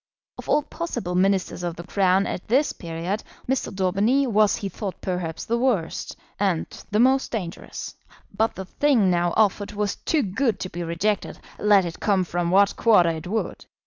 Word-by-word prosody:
Of - - -9
all 300 - +3
possible 295 - -4
Ministers 190 0 +1
of 175 -2 -3
the 170 - -8
Crown 190 +1 +2
at 180 - -5
this 270 +6 +2
period, 170 +4 -4 0.3
Mr. 265 0 -1
Daubeny 200 +8 +2
was 215 -4 +3
he 200 - -4
thought 195 0 -6
perhaps 180 -3 -3
the 235 +1 0
worst, 230 -11 -1 0.2
and 190 -5 +1 0.2
the 210 0 +1
most 265 +3 +3
dangerous. 180 -7 -5 0.4
But 220 +3 +1
the 190 - -6
thing 230 -3 +2
now 175 0 +1
offered 205 -1 +2
was 205 -1 -2
too 310 -4 0
good 220 +2 0
to 185 - -4
be 175 - -5
rejected, 175 +5 -1 0.2
let 205 -3 +4
it 170 - -6
come 200 -4 +2
from 175 0 -2
what 195 +2 +4
quarter 205 -7 +5
it 160 +1 -6
would. 220 +4 -3
195 Hz, 175 wpm, -24 LUFS, 180-220 Hz, 0.4 s, quarter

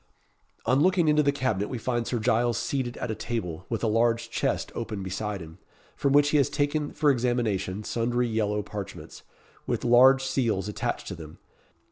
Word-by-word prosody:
On 130 +4 +3
looking 180 +1 +3
into 150 0 +4
the 140 -1 +3
cabinet 130 -8 -1
we 125 - -3
find 120 0 -2
Sir 125 - -1
Giles 120 +1 +1
seated 130 -3 -2
at 125 - -3
a - - -1
table, 105 -6 -4
with 115 -1 -3
a - - +2
large 115 +1 +1
chest - - -1
open 100 -2 -4
beside 95 +1 -4
him, 80 +2 -11 0.4
from 140 - 0
which 145 +1 +5
he 150 - +3
has 140 - +3
taken 145 0 -1
for 150 -2 +3
examination 110 -6 -1
sundry 120 +2 0
yellow 105 -2 0
parchments, 100 -1 -8 0.5
with - - -2
large 130 +3 +6
seals 115 -8 0
attached 105 - -3
to - - -4
them. 80 -1 -10
120 Hz, 180 wpm, -27 LUFS, 105-135 Hz, 0.5 s, large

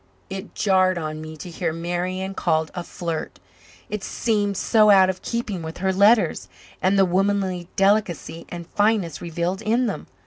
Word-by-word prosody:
It 195 +2 -7
jarred 185 -2 +3
on 155 -1 -4
me 155 0 -8
to 155 - -8
hear 165 - -2
Marian 175 +3 -3
called 160 -4 0
a 175 - -4
flirt. 170 -3 -5 0.5
It 210 -2 -5
seemed 205 -3 0
so 215 -2 +4
out 190 -2 +6
of 185 - -13
keeping 230 -6 -3
with 160 0 -7
her 190 +1 0
letters 210 +4 +3 0.3
and 190 +2 +3
the 195 - +5
womanly 185 -1 0
delicacy 195 -4 +1
and 175 -1 -7
fineness 205 -4 0
revealed 170 +3 -2
in 230 +3 +1
them. 220 - -4
185 Hz, 165 wpm, -23 LUFS, 170-205 Hz, 0.5 s, out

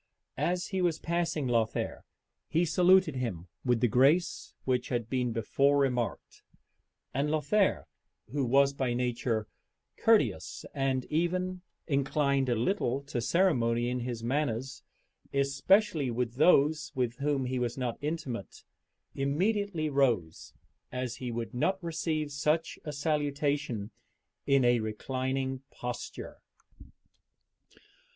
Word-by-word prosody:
As 180 0 0
he 190 -2 -1
was 170 -3 +1
passing 165 -4 -1
Lothair, 115 -2 0 0.5
he 170 +2 +2
saluted 180 -3 +4
him 95 -9 -4
with 120 -3 +1
the 125 - +4
grace 135 - +2
which 125 -1 0
had 120 -2 -2
been 125 -2 0
before 140 +6 +2
remarked; 125 -4 -1 0.7
and 140 +3 0
Lothair, 155 - +2 0.5
who 140 0 0
was 135 +3 +4
by 130 -3 -1
nature 120 -3 -1 0.5
courteous, - - +2
and 135 -2 0
even 180 +3 0 0.2
inclined 140 -2 +1
a 120 - +2
little 135 - 0
to 125 -3 -3
ceremony 120 -7 +2
in 125 - -1
his 120 -2 -4
manners, 130 -1 -1 0.5
especially 140 - +2
with 120 0 -2
those 150 +1 +4
with 125 -2 -1
whom 140 -2 0
he 125 0 -2
was 120 0 -2
not 125 -3 -3
intimate, 145 -9 -4 0.5
immediately 175 +4 0
rose, 120 - 0 0.4
as 125 -1 -3
he 125 - -5
would 115 0 -4
not 160 +10 +1
receive 155 -2 -2
such 150 +3 0
a 150 - -4
salutation 145 -6 -1 0.6
in 140 -2 +4
a 120 0 +4
reclining 130 +4 -2
posture. 125 0 -7
135 Hz, 120 wpm, -30 LUFS, 120-155 Hz, 0.7 s, saluted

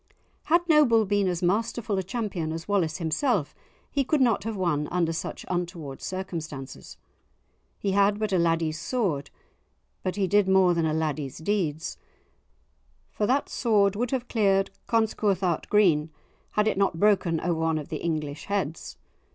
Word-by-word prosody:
Had 345 +2 +2
Noble 270 -9 +5
been 205 0 +1
as 180 -1 -2
masterful 220 +3 0
a - - +1
champion 190 -5 -3
as 165 0 -6
Wallace 180 -6 +1
himself, 175 - 0 0.4
he 280 - +1
could 300 +3 +1
not 230 -6 +2
have 225 -1 -3
won 150 -5 0
under 170 -2 0
such 160 - -5
untoward 175 -6 -4
circumstances. 165 -7 -6 0.8
He 200 - -1
had 200 +1 +3
but 215 -2 -2
a 185 - +3
laddie's 165 -2 +1
sword, 175 - -1 0.7
but 185 - -2
he 200 -2 +1
did 200 +1 +3
more 190 -2 +5
than 165 -2 +1
a 155 - 0
laddie's 150 -4 -2
deeds, 160 -3 -2 1.1
for 210 - -1
that 270 +3 +1
sword 205 -4 +2
would 240 +3 -1
have 255 -1 -2
cleared 195 -3 +2 0.2
Conscouthart 200 -6 0
green 170 -8 +3 0.4
had 210 0 +2
it 205 - 0
not 190 -4 +1
broken 190 -5 +3
over 170 -1 -1
one 160 -1 +1
of 150 0 -6
the 160 - -3
English 155 -2 -3
heads. 190 -6 -3
190 Hz, 160 wpm, -26 LUFS, 160-210 Hz, 1.1 s, Noble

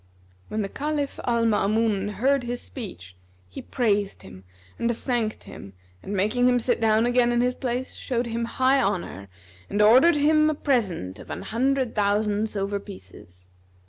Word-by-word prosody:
When 215 0 -2
the - - -2
Caliph 290 +4 -3
Al 235 -1 +1
Maamun 210 -1 +1
heard 270 +7 +2
his 245 0 -4
speech, 95 - -9 0.3
he 90 - -9
praised 205 -5 -1
him 95 0 -13 0.3
and 235 -1 0
thanked 235 -4 -2
him 100 - -11 0.3
and 200 - -5
making 225 +6 +2
him 245 - +3
sit 240 0 0
down 220 0 +3
again 245 0 +3
in 240 0 +2
his 250 +1 +1
place, 250 0 -3
showed 245 -2 -2
him 235 0 -2
high 260 +3 +2
honour 170 - -3 0.4
and 205 - -2
ordered 255 +11 +6
him 305 +1 +4
a 310 - -1
present 190 - -1
of - - -12
an - - -5
hundred 260 +2 0
thousand 210 +1 +1
silver 200 0 -2
pieces. 90 - -14
225 Hz, 165 wpm, -25 LUFS, 200-250 Hz, 0.4 s, ordered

